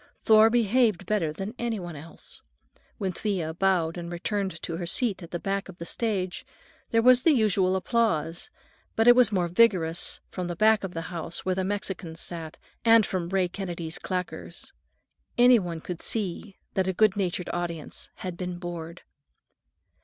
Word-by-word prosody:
Thor 220 0 +7
behaved 225 -4 +2
better 180 -6 0
than 195 +7 -5
any 235 -3 -1
one 175 -3 -7
else. 155 +3 -9 0.6
When 190 -2 -2
Thea 180 -4 -2
bowed 175 -2 +1
and 170 0 -6
returned 190 0 -3
to 165 - -3
her 175 -1 -4
seat 205 +1 +1
at 170 - -9
the 175 - -3
back 195 +2 -3
of 180 - -11
the 170 - -7
stage 185 -3 -1 0.5
there 230 0 +2
was 250 0 +7
the 320 +3 +5
usual 195 -5 +2
applause, 185 -6 0 0.5
but 225 +1 +2
it 245 - +9
was 250 -4 +5
vigorous 180 -3 +2
only - - -45
from 180 -2 -3
the 175 - -4
back 215 +3 +4
of 185 -3 -5
the 165 - -2
house 165 0 -4
where 185 - +1
the 190 +1 -1
Mexicans 190 -4 -3
sat, 165 -2 -3 0.3
and 225 -2 +6
from 175 -3 -3
Ray 190 -1 +1
Kennedy's 175 -3 -5
claqueurs. 180 -1 -5 0.6
Any 245 0 +7
one 170 -4 -4
could 175 0 -6
see 200 -1 -2 0.2
that 190 -1 0
a 190 - 0
good 215 +1 +3
natured 180 -3 -2
audience 170 -3 -4
had 185 -2 -6
been 180 0 -5
bored. 175 -1 -7
185 Hz, 175 wpm, -27 LUFS, 170-215 Hz, 0.6 s, it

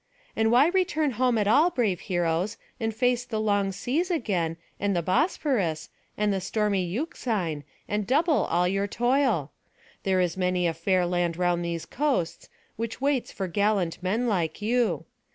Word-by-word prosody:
And 220 0 +2
why 265 +7 +6
return 345 -6 +1
home 250 0 +1
at 210 -2 +1
all, 290 +11 +5
brave 220 - 0
heroes, 175 +3 -1 0.2
and 225 -1 -1
face 245 +2 +1
the 230 -3 -3
long 205 -2 +1
seas 285 - -1
again, 185 - -1 0.2
and 200 -1 0
the 170 - 0
Bosphorus, 210 - 0 0.3
and 210 -1 +1
the 190 - -1
stormy 205 -1 0
Euxine, 190 - -2 0.2
and 210 -1 -2
double 305 +3 +3
all 175 +1 +1
your 195 +2 0
toil? 240 - +1 0.5
There 190 -1 +1
is 175 -2 +1
many 180 -1 +1
a 165 - +1
fair 180 +2 +1
land 175 -1 0
round 175 -1 +1
these 170 -1 -3
coasts, 270 - -1 0.3
which 225 0 -4
waits 275 -2 0
for 190 - -4
gallant 200 -2 0
men 210 +7 0
like 170 -8 -1
you. 235 +3 0
205 Hz, 165 wpm, -26 LUFS, 180-245 Hz, 0.5 s, why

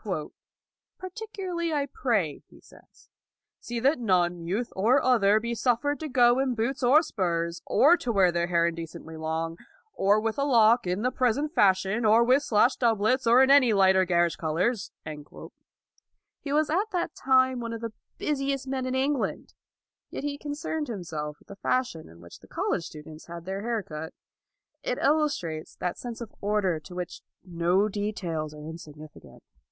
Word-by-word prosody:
" - - -66
Particularly 370 -3 -5
I 285 -2 0
pray," 220 - -1
he - - -18
says, - - -21 0.3
" - - -64
see 240 0 -4
that 275 +2 +3
none, 175 -6 +1
youth 215 +7 -2
or 230 +8 +3
other, 215 -5 +3
be 235 +1 -3
suffered 245 +5 0
to 310 - -5
go 245 -1 +4
in 265 -2 0
boots 240 +5 -2
or 270 +6 +5
spurs, 170 - -2
or 335 +5 +5
to 245 - -3
wear 190 -4 +4
their 170 0 0
hair 170 -1 +2
indecently 165 -1 -5
long, 160 +1 -3 0.3
or 200 +2 +3
with 225 +3 -2
a - - +2
lock 235 -5 +4
in 180 +4 -1
the 250 - +1
present 260 +5 0
fashion, 195 - +2
or 220 +2 +5
with 255 +4 +4
slashed 235 -1 +2
doublets, 230 +2 +2
or 245 +3 +7
in 265 - +4
any 265 -5 +6
light 190 -1 +5
or 190 0 +4
garish 175 -1 +2
colors." 185 +7 -1 1.5
He 280 - -6
was 300 +1 +2
at 395 +7 +1
that 345 -3 -2
time 260 -1 +2
one 230 -1 -4
of 230 -1 -6
the 230 - -3 0.3
220 - - -7
LAUD - - +1
busiest 275 -1 -2
men 260 -1 -2
in 255 - -2
England, 275 +1 -1 0.6
yet - - -6
he 285 -1 -3
concerned 295 +1 -4
himself 160 -8 -5
with - - -26
the 200 - -10
fashion 240 -10 -2
in 85 +1 -16
which 85 - -13
the - - -18
college 165 - -2
students 155 0 -11
had 170 0 -9
their 190 +1 -4
hair 230 -1 -2
cut. 160 -1 -8 0.7
It - - -2
illustrates 280 - 0
that 180 - -4
sense 240 -1 -7
of 230 - -8
order 200 -5 0
to 180 +3 -12
which 180 -1 -6 0.2
no 175 +3 +1
details 180 -7 -3
are 150 0 -10
insignificant. 155 - -12
220 Hz, 180 wpm, -27 LUFS, 175-260 Hz, 1.5 s, or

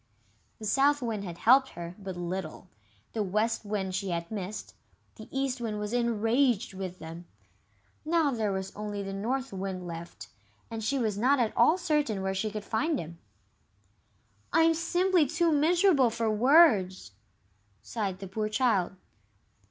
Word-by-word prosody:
The 220 - -8
South 275 +5 +3
Wind 220 -4 -2
had 170 -2 -7
helped 265 +7 +5
her 170 0 -6
but 190 -2 -6
little, 175 -1 -5 0.5
the 220 - -1
West 215 +4 0
Wind 200 -2 -2
she 195 +1 -2
had 170 +1 -3
missed, 205 0 -5 0.4
the 220 - -12
East 270 -2 -2
Wind 215 -3 -3
was 210 +2 -4
enraged 235 -1 +1
with 185 -1 -6
them. 165 +1 -9 0.8
Now 320 -2 +2
there 220 -5 -1
was 190 0 -4
only 205 -1 -4
the 195 0 -5
North 250 +5 -2
Wind 190 -1 -4
left, 165 -10 -8 0.4
and 225 -1 -4
she 275 +6 0
was 215 -5 -1
not 265 +4 +3
at 230 -3 0
all 325 - +5
certain 300 - 0
where 190 0 -1
she 195 +3 -1
could 210 -1 -6
find 295 +7 0
him. 165 -3 -7 1.3
"I'm 325 0 +5
simply 350 0 +2
too 325 +3 +1
miserable 315 -2 +4
for 225 -1 -1
words!" 215 - +4 0.7
sighed 200 -5 -3
the 195 0 -8
poor 215 +3 -2
child. 215 -6 +1
215 Hz, 155 wpm, -29 LUFS, 190-270 Hz, 1.3 s, helped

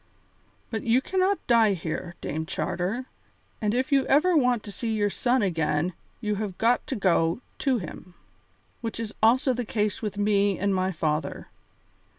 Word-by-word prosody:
"But 220 - -2
you 235 +2 +3
cannot 375 +6 0
die 230 -4 +5
here, 175 0 -4
Dame 160 +1 -3
Charter; 190 +13 -2 0.6
and 210 -1 +1
if 260 +3 0
you 275 -1 +3
ever 335 +6 +4
want 250 -6 +3
to 205 - -8
see 225 +4 -3
your 205 -2 +1
son 250 +2 +1
again 160 -2 0 0.3
you 210 -2 0
have 195 -4 -4
got 235 +2 +2
to 270 - -2
go 175 0 +2 0.2
to 270 -3 +2
him. 180 -1 -8 0.7
Which 230 -1 -4
is 225 -2 -4
also 250 +4 +4
the 245 0 -2
case 210 -2 -1
with 210 -2 -4
me 205 -1 +2
and 200 0 +1
my 185 0 +1
father. 155 -2 -2
210 Hz, 165 wpm, -26 LUFS, 185-245 Hz, 0.7 s, die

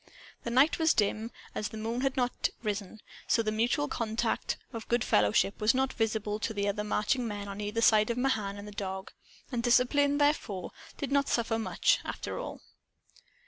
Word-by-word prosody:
The - - -4
night 265 +8 +4
was 320 0 +4
dim, 215 +2 +1 0.2
as 210 - -2
the 220 - -8
moon 225 +3 -2
had 270 -1 0
not 245 -1 0
risen; 210 0 -3 0.3
so 230 - +3
the 215 - 0
mutual 240 +7 +1
contact 230 -4 -1 0.2
of 225 -1 -6
good 240 -1 +2
fellowship 105 - +2
was 215 +3 +4
not 265 0 +1
visible 215 -2 -1
to 220 0 -3
the 200 0 0
marching 215 +4 0
men 205 -1 -5
on 200 +1 -6
either 210 +2 -2
side 215 -1 +5
of 235 - -1
Mahan 220 -6 0
and 205 +1 -8
the - - -8
dog. 190 -1 -5 0.4
And 240 -2 -1
discipline, 270 +4 +3
therefore, 290 -10 0 0.3
did 280 - -4
not 280 0 +3
suffer 230 -1 +1
much, 220 - +2
after - - -5
all. - - -7
225 Hz, 185 wpm, -30 LUFS, 210-250 Hz, 0.4 s, side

